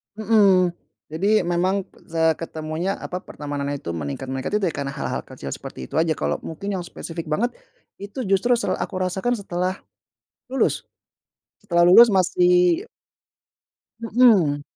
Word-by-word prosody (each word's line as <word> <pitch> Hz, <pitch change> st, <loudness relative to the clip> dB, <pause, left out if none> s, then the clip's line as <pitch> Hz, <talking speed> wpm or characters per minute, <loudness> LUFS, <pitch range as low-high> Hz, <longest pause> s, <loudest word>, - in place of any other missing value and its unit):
Mhm. 200 Hz, -4 st, +4 dB, 0.4 s
Jadi 200 Hz, +8 st, +2 dB
memang, 185 Hz, +3 st, 0 dB, 0.2 s
seketemunya, 160 Hz, +2 st, -1 dB
apa, 180 Hz, 0 st, -6 dB
pertemanannya 145 Hz, -1 st, -4 dB
itu, 85 Hz, -7 st, -5 dB
meningkat 75 Hz, -, -5 dB
meningkat 135 Hz, +10 st, -2 dB
itu, 200 Hz, -, 0 dB
ya, 165 Hz, -, -3 dB
karena 140 Hz, -1 st, -3 dB
hal-hal -, -, -4 dB
kecil 70 Hz, -, -10 dB
seperti 65 Hz, -, -9 dB
itu -, -, -9 dB
aja, 160 Hz, +1 st, +2 dB
kalau -, -, 0 dB
mungkin 195 Hz, +5 st, -4 dB
yang 180 Hz, -, -3 dB
spesifik 165 Hz, -1 st, -7 dB
banget, 235 Hz, +11 st, 0 dB, 0.4 s
itu 205 Hz, +4 st, -6 dB
justru 195 Hz, +5 st, +2 dB
se -, -, -3 dB
aku 195 Hz, -, -5 dB
rasakan 190 Hz, +6 st, 0 dB
setelah 185 Hz, -1 st, -2 dB, 0.7 s
lulus, 265 Hz, +1 st, 0 dB, 0.8 s
setelah 175 Hz, -4 st, +3 dB
lulus 230 Hz, +6 st, +8 dB
masih 355 Hz, -, +3 dB, 1.2 s
Mhm. 210 Hz, -11 st, +4 dB
185 Hz, 135 wpm, -23 LUFS, 160-210 Hz, 1.2 s, lulus